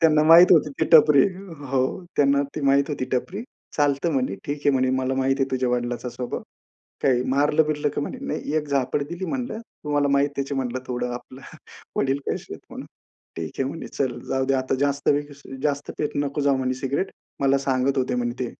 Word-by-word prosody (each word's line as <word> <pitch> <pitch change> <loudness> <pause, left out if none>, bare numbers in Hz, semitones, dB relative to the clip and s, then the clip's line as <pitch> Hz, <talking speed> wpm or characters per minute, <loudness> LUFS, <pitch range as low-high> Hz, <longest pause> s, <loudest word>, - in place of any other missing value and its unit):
त्यांना 155 -2 +5
माहीत 170 +4 +8
होती 155 -3 +4
ती - - +4
टपरी. 150 -3 +8 0.5
हो, 135 -1 +2 0.3
त्यांना 140 0 +4
ते - - -2
माहीत 140 +2 +3
होती 140 -3 -2
टपरी. 185 - -2 0.3
चालतं 145 +2 +1
म्हणे, 130 -8 0
ठीक 145 - -2
आहे - - +5
म्हणे, 130 -1 +2
"मला 130 0 0
माहिती 135 +1 +1
आहे 135 - -2
तुझ्या 130 -1 0
वडिलांचा 120 0 -2
स्वभाव. 125 0 -5 0.6
काही 125 -2 +3
मारलं-बिरलं 150 +2 +2
का - - -1
म्हणे, 255 - -5
नाही - - -3
एक 150 -1 0
झापड 140 0 0
दिली 170 +3 -5
म्हणलं, 250 -3 -3 0.3
तुम्हाला 145 -1 +1
माहीत 140 +1 +1
आहे 140 +1 -2
म्हणलं 130 -1 -2
थोडं 125 0 -2
आपलं 130 +2 -10 0.6
वडील 135 0 +1
कसे - - -4
आहेत - - -12
म्हणून." - - -8 0.5
ठीक 80 -2 -4
आहे 135 - +1
म्हणे, 165 - -6
"चल 125 -3 -2
जाऊ 135 0 0
दे 135 - +2
आता 130 0 0
जास्त 140 0 0 0.5
जास्त 145 -1 -1
पित 150 - -2
नको 145 0 -1
जाऊ 140 -1 +3
म्हणे 130 -1 -1
सिगारेट." 140 +8 -2 0.3
मला 135 0 +3
सांगत 135 0 0
होते 130 -1 0
म्हणे 120 -1 -1
ते 125 - 0
140 Hz, 195 wpm, -24 LUFS, 130-145 Hz, 0.6 s, माहीत